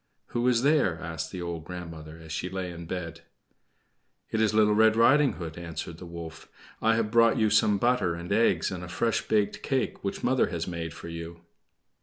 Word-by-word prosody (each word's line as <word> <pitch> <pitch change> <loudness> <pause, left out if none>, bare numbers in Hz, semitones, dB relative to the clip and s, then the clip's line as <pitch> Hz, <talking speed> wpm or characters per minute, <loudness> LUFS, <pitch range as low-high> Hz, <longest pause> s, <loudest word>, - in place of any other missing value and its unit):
"Who 120 +1 0
is 125 -1 +3
there?" 140 - +3
asked 80 -1 -5
the 90 -2 -5
old 85 -2 -4
grandmother, 80 -3 -8
as 80 -1 -12
she 90 +3 -3
lay 95 -1 -4
in 85 -1 -9
bed. 85 -2 -5 1.1
"It 110 - +1
is 110 - +3
Little 105 -1 +4
Red 110 +1 +5
Riding 135 +5 +5
Hood," 85 -1 -7
answered 85 0 -6
the 90 - -9
wolf. 85 -1 -9 0.3
"I 115 0 +3
have 110 -2 0
brought 115 -1 +5
you 110 -1 +2
some 105 -1 +4
butter 120 -6 +1
and 85 +2 -7
eggs 115 -1 +2
and 90 -1 -5
a - - -6
fresh 115 +5 0
baked 105 -2 +1
cake 135 -2 -1
which 100 - -4
mother 130 +1 +3
has 85 -1 -4
made 85 -2 -5
for - - -9
you." 85 0 -7
90 Hz, 200 wpm, -27 LUFS, 85-110 Hz, 1.1 s, Red